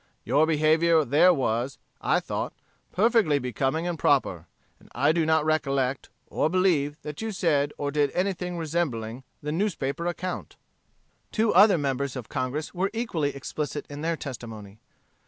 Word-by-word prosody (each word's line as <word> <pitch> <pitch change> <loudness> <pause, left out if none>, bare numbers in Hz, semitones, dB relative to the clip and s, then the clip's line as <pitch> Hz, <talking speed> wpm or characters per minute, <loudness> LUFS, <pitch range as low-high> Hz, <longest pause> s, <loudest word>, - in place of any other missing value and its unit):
Your 145 +7 +3
behavior 160 +1 +3
there 150 +8 +5
was, 130 -4 -1 0.2
I - - +2
thought, - - -4 0.4
perfectly 210 -6 +3
becoming 135 +5 -1
and 170 -3 -3
proper. - - +1 0.3
And - - -20
I 140 +6 +3
do 160 -1 +1
not 160 -1 +3
recollect, 140 -4 0 0.2
or 155 - 0
believe, 160 -5 +1
that 150 +3 -6
you 225 0 -2
said 150 -7 +1
or 145 0 -2
did 145 -1 +2
anything 180 -1 -1
resembling 135 -8 -2 0.2
the 150 - -2
newspaper 170 -3 -1
account." 180 +1 -4 0.8
Two 220 0 +2
other 200 0 +7
members 140 -2 -2
of 125 -4 -7
Congress 135 +5 -3
were 190 +2 0
equally 170 -12 -1
explicit 145 +2 -4
in 145 +1 -6
their 165 +1 -1
testimony. 110 -7 -8
150 Hz, 150 wpm, -26 LUFS, 140-175 Hz, 0.8 s, other